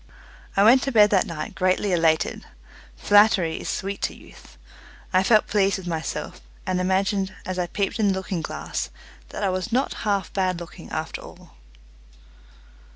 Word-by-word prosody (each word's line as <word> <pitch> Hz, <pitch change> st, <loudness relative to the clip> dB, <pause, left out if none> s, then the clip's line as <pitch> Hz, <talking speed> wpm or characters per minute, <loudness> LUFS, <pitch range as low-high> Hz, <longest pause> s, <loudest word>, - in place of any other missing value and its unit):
I 200 Hz, -, +6 dB
went 245 Hz, +5 st, +7 dB
to 275 Hz, -, -2 dB
bed 210 Hz, -3 st, +6 dB
that 200 Hz, +1 st, +3 dB
night 155 Hz, -3 st, -5 dB
greatly 185 Hz, +2 st, +1 dB
elated. 160 Hz, -2 st, +1 dB, 0.5 s
Flattery 205 Hz, -5 st, +4 dB
is -, -, -5 dB
sweet 195 Hz, +1 st, -3 dB
to -, -, -2 dB
youth. -, -, -16 dB, 0.6 s
I 185 Hz, -, +5 dB
felt 215 Hz, +2 st, +4 dB
pleased 200 Hz, -2 st, +1 dB
with 190 Hz, -, -9 dB
myself, 165 Hz, -2 st, -4 dB, 0.2 s
and 185 Hz, 0 st, 0 dB
imagined, 190 Hz, +1 st, 0 dB
as 185 Hz, 0 st, -3 dB
I 175 Hz, -, 0 dB
peeped 200 Hz, +4 st, -2 dB
in 210 Hz, -, +3 dB
the 195 Hz, -, +3 dB
looking 190 Hz, -2 st, -3 dB
glass, -, -, -4 dB, 0.4 s
that -, -, -6 dB
I 195 Hz, -, +2 dB
was 185 Hz, +4 st, -3 dB
not 255 Hz, +4 st, +1 dB
half 200 Hz, -3 st, -1 dB
bad 185 Hz, -3 st, 0 dB
looking 170 Hz, -, -10 dB
after -, -, -4 dB
all. -, -, -14 dB
190 Hz, 165 wpm, -24 LUFS, 180-205 Hz, 0.6 s, went